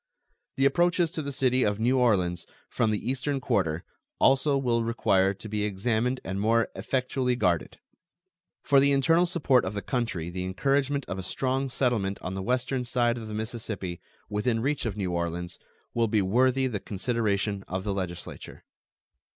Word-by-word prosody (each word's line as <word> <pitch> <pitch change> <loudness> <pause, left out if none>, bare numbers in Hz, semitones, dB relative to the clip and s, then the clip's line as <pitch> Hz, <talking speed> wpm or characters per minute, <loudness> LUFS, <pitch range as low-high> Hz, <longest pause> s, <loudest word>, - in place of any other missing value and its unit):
The 135 - +2
approaches 175 +2 +3
to 165 - -3
the 140 -1 -4
city 130 -1 +2
of 105 -3 +1
New 125 +3 +2
Orleans 90 -8 +1 0.2
from 115 - +1
the 105 -1 -2
eastern 135 +2 -1
quarter 85 -9 0 0.4
also 135 +1 +4
will 120 -3 +1
require 95 -4 +2
to 110 - -9
be 105 0 -2
examined 110 +5 0
and 95 +1 -3
more 115 +2 +2
effectually 130 -1 -1
guarded. 90 -9 0 0.9
For 140 -2 +5
the 140 +1 +4
internal 165 +6 +4
support 145 -7 +3
of 95 +3 -4
the 100 - -2
country 105 -10 -2
the 90 +1 -4
encouragement 135 +8 0
of 95 - -5
a - - -2
strong 130 +7 -1
settlement 115 -7 0
on 90 - -3
the 95 - -3
western 125 +4 -1
side 120 -1 +1
of 110 - -7
the 105 - -5
Mississippi, 110 -5 -4 0.3
within 105 +3 0
reach 135 +1 -1
of 105 -2 -4
New 95 -3 -2
Orleans, 85 0 -3 0.3
will 115 -1 +2
be 105 -2 +2
worthy 130 +6 +3
the 115 -6 -2
consideration 100 -2 -1
of 95 +1 -3
the 100 -1 -1
Legislature. 90 -3 -6
115 Hz, 170 wpm, -27 LUFS, 95-130 Hz, 0.9 s, For